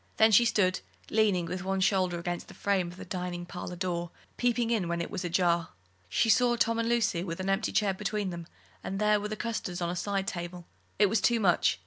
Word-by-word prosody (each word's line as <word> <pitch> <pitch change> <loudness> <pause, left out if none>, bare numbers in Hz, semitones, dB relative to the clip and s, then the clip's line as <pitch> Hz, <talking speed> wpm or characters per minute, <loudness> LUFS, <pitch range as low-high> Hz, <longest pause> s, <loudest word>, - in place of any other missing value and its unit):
Then 220 0 +6
she 235 +3 +6
stood 185 -5 +2 0.3
leaning 205 -5 +2
with 180 +2 -4
one 190 0 -1
shoulder 185 -2 +2
against 175 +1 -4
the - - -13
frame 195 -3 0
of 175 +1 -10
the - - -8
dining 180 -2 -4
parlour 180 0 -6
door, 175 -1 -2 0.3
peeping 240 -1 +1
in 210 -7 +1
when 170 0 -1
it 170 - -4
was - - -3
ajar. 170 -1 +1 0.4
She 165 - +2
saw 240 +2 +4
Tom 230 -1 +1
and 230 0 0
Lucy 225 -7 +1
with 170 -2 -5
an 185 +1 -2
empty 195 +3 0
chair 205 -2 +2
between 205 0 -2
them, 170 -1 -7 0.4
and 195 - -4
there 210 0 +3
were 210 - -3
the 215 - -4
custards 215 -6 -3
on 175 -1 -1
a - - -4
side 195 +1 -1
table 175 -2 -5 0.3
it 205 - +5
was 220 +3 +1
too 235 -1 +3
much. 175 - +2
190 Hz, 230 wpm, -29 LUFS, 175-215 Hz, 0.4 s, Then